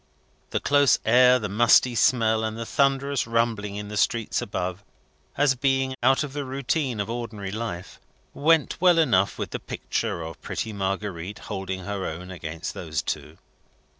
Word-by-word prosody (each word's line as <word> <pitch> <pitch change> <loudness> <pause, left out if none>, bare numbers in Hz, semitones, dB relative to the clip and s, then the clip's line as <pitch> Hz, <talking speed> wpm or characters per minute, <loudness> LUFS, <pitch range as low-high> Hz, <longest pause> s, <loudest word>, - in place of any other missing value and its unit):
The - - -1
close 145 -3 +4
air, 125 +2 +6
the 105 -4 -3
musty 120 +4 +4
smell, 110 -2 +3
and 110 0 -3
the 115 - -4
thunderous 140 0 +1
rumbling 115 -3 0
in 105 0 -6
the 105 - -6
streets 115 +2 +1
above, 90 +2 -4 0.5
as 145 -1 +4
being, 135 0 0
out 135 +4 +4
of 140 -3 -6
the 145 0 -3
routine 135 -2 -2
of 100 - -1
ordinary 110 -4 -5
life, 105 -5 -5 0.3
went 160 +2 +2
well 180 -2 +6
enough 110 - +3
with - - -4
the - - -3
picture 85 - -3
of 80 -1 -9
pretty 110 - -4
Marguerite 100 -1 -3 0.2
holding 95 -1 -4
her 100 +1 -4
own 90 +4 -7
against 80 0 -6
those 80 -4 -3
two. - - -5
110 Hz, 165 wpm, -25 LUFS, 95-135 Hz, 0.5 s, air